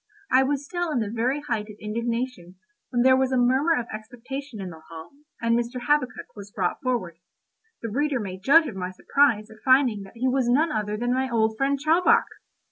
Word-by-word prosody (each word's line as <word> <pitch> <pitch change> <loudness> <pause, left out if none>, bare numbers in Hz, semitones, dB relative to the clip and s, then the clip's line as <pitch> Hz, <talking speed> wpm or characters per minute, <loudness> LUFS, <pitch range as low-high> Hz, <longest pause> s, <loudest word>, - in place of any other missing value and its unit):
I 260 +1 +6
was 280 +1 -1
still 350 +1 -3
in 295 - 0
the 215 -3 -1
very 250 +5 -1
height 230 -7 -3
of 210 - -11
indignation, 230 -3 -4 0.3
when 240 -2 +1
there 260 0 +6
was 265 0 +1
a 260 - +2
murmur 260 +7 +3
of 235 - -4
expectation 245 +3 -7
in 190 -2 -6
the 160 -1 -12
hall, 160 -1 -10 0.3
and 230 0 +1
Mr. 240 +1 -2
Habakkuk 255 -1 -1
was 205 -1 -10
brought 185 -3 -2
forward. 215 -10 -2 0.6
The 230 - -4
reader 285 +2 0
may 190 -3 -6
judge 290 - +5
of 245 -9 -6
my 180 -1 -4
surprise 220 +2 +1
at 220 - -14
finding 260 -5 +4
that 195 0 -12
he 255 +3 0
was 255 -1 +1
none 305 +6 +3
other 210 -2 -2
than 245 +2 0
my 260 +1 0
old 220 -2 +1
friend 275 +4 +1
Chowbok! 360 +10 +4
245 Hz, 210 wpm, -25 LUFS, 215-270 Hz, 0.6 s, I